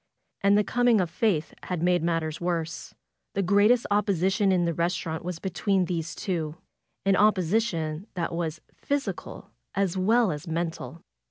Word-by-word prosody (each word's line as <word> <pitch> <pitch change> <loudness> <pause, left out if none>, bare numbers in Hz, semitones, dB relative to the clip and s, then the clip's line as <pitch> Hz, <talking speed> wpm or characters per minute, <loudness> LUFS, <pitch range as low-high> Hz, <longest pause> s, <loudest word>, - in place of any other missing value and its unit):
And 200 +1 +5
the 210 - +4
coming 245 0 +3
of 175 -3 0
Faith 180 -4 0
had 180 -3 -3
made 180 -1 +3
matters 165 -1 -1
worse. 165 -2 -3 0.4
The 195 - +1
greatest 205 +6 +4
opposi 195 -3 +2
tion 200 -1 +2
in 180 -2 +2
the 170 - 0
restaurant 170 -1 -2
was 180 -1 -4
between 190 +1 0
these 170 -1 -3
two; 160 -5 -3 0.5
an 195 - +4
oppo 205 -1 +4
sition 170 -4 -1
that 170 -1 -2
was 165 -2 -3
physical 285 0 -4 0.2
as 195 -2 0
well 225 +3 +3
as 150 +1 -6
mental. 165 0 -4
180 Hz, 160 wpm, -27 LUFS, 165-200 Hz, 0.5 s, And